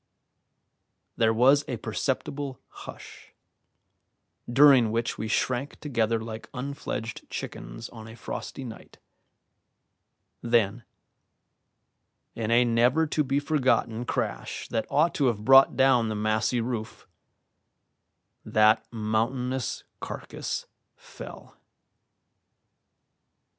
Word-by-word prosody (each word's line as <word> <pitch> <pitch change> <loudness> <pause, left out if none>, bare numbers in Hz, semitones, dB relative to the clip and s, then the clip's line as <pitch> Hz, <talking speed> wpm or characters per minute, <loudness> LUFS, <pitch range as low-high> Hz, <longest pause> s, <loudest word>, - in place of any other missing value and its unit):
There 110 -1 +3
was 135 +6 +5
a 125 - -3
perceptible 135 +4 -3
hush, - - -12 1.2
during 135 -3 +7
which 115 +1 -2
we 110 - -2
shrank 130 +5 -1
together 115 -5 0
like 110 0 -7
unfledged 125 -3 -5
chickens - - -6
on 110 -2 -11
a 110 - -10
frosty 125 +4 -6
night; 115 -3 -10 1.4
then, 115 -1 +1 1.5
in 110 -1 -3
a 120 +1 +5
never 120 +7 +3
to 150 0 0
be 135 +1 0
forgotten 130 -6 +1
crash - - -3
that 110 -1 -2
ought 160 +4 +3
to 140 - +1
have 105 -3 -1
brought 135 +1 +7
down 130 -4 +4
the 110 - -2
massy 110 +3 +1
roof, 115 -3 -5 1.4
that 110 0 +4
mountainous 120 +4 -1 0.2
carcass - - -5 0.3
fell. - - -12
120 Hz, 95 wpm, -27 LUFS, 110-135 Hz, 1.5 s, during